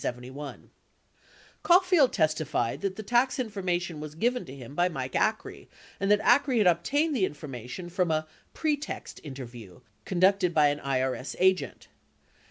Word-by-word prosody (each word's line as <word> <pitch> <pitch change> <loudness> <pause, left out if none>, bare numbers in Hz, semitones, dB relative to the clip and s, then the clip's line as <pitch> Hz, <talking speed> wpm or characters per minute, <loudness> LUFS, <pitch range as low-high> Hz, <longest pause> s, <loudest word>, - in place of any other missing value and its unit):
46 125 +2 -5 1.3
Caulfield 360 -6 +5
testified 155 - 0
that 195 -1 -2
the 215 - -7
tax 245 +5 +2
information 180 - -2
was 150 0 -8
given 240 +8 0
to 135 - -10
him 130 -1 -10
by 175 +4 +2
Mike 130 -5 -5
Acree, - - -1 0.3
and 195 - 0
that 210 0 +5
Acree 255 +2 +3
had 215 - +4
obtained 280 - +2
the 220 - +1
information 140 +1 -7
from 180 0 0
a 155 0 0 0.3
"pretext 300 -2 -3
interview" 120 - -9 0.2
conducted 185 - +2
by 150 -2 +5
an 145 0 -2
IRS 130 -1 -2
agent. 190 0 +1
175 Hz, 145 wpm, -28 LUFS, 140-215 Hz, 1.3 s, Caulfield